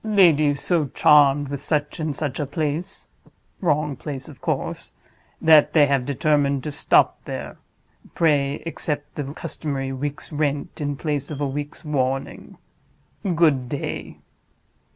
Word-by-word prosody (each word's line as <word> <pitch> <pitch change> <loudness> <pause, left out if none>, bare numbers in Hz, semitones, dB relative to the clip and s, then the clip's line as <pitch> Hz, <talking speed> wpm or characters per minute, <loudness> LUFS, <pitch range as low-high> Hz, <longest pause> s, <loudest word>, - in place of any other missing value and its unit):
'Ladies 160 -9 +4
so 165 -5 +1
charmed 145 0 +5
with 140 -1 -4
such 150 0 -1
and 155 -2 -2
such 145 -2 -3
a 145 - 0
place 155 +3 -3 0.5
(wrong 150 -4 +1
place 135 -2 -7
of - - -13
course), - - -3 0.5
that 155 -2 +6
they 150 -3 +6
have 140 -3 0
determined 140 -1 +1
to 150 - -4
stop - - +2
there. - - -6 0.6
Pray 145 -3 +1
accept 150 -3 -4
the 140 -2 -5
customary 135 -3 -4
week's 140 +2 -5
rent, 145 -1 -2
in 145 -1 -1
place 145 -1 -3
of 150 -3 -5
a 145 - 0
week's 145 +4 -6
warning. 135 -2 -2 0.8
Good 145 -7 +3
day. 140 - -5
145 Hz, 135 wpm, -23 LUFS, 140-155 Hz, 0.8 s, that